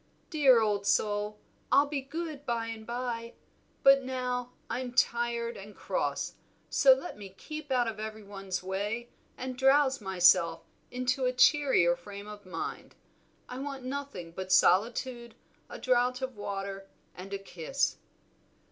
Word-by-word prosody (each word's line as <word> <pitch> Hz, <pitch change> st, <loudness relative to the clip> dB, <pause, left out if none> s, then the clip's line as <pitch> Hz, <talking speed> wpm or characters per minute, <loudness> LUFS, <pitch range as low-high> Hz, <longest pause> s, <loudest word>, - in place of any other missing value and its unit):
"Dear 270 Hz, -7 st, +6 dB
old 205 Hz, -2 st, 0 dB
soul, 210 Hz, 0 st, +1 dB, 0.3 s
I'll 285 Hz, -, +6 dB
be 285 Hz, -1 st, -3 dB
good 310 Hz, +1 st, -6 dB
by 235 Hz, -4 st, -1 dB
and 225 Hz, -1 st, -7 dB
by, 235 Hz, -1 st, -4 dB, 0.5 s
but 275 Hz, 0 st, +7 dB
now 250 Hz, -1 st, -3 dB
I'm 250 Hz, -1 st, -4 dB
tired 235 Hz, -2 st, +1 dB
and 205 Hz, +1 st, -10 dB
cross, -, -, -2 dB, 0.4 s
so 275 Hz, -, +6 dB
let 260 Hz, -4 st, -6 dB
me 200 Hz, -2 st, -8 dB
keep 305 Hz, +3 st, -8 dB
out 245 Hz, -2 st, +2 dB
of 220 Hz, -2 st, -4 dB
every 215 Hz, 0 st, -6 dB
one's 195 Hz, -2 st, -5 dB
way 205 Hz, +5 st, -3 dB, 0.3 s
and 255 Hz, 0 st, -5 dB
drowse 270 Hz, 0 st, +4 dB
myself 185 Hz, -3 st, +4 dB, 0.3 s
into 255 Hz, +1 st, 0 dB
a 250 Hz, -, +3 dB
cheerier 250 Hz, -10 st, +4 dB
frame 200 Hz, +4 st, -10 dB
of 205 Hz, -2 st, -10 dB
mind. 165 Hz, -3 st, -6 dB, 0.5 s
I 250 Hz, -, -7 dB
want 275 Hz, -1 st, -5 dB
nothing 260 Hz, -10 st, -5 dB
but 185 Hz, +2 st, -6 dB
solitude, 235 Hz, +6 st, +2 dB, 0.3 s
a -, -, -7 dB
draught 250 Hz, 0 st, +1 dB
of 260 Hz, -1 st, -4 dB
water, 195 Hz, -1 st, -5 dB, 0.2 s
and 190 Hz, +2 st, -10 dB
a 200 Hz, -, -2 dB
kiss." 195 Hz, -, -2 dB
235 Hz, 145 wpm, -30 LUFS, 200-260 Hz, 0.5 s, but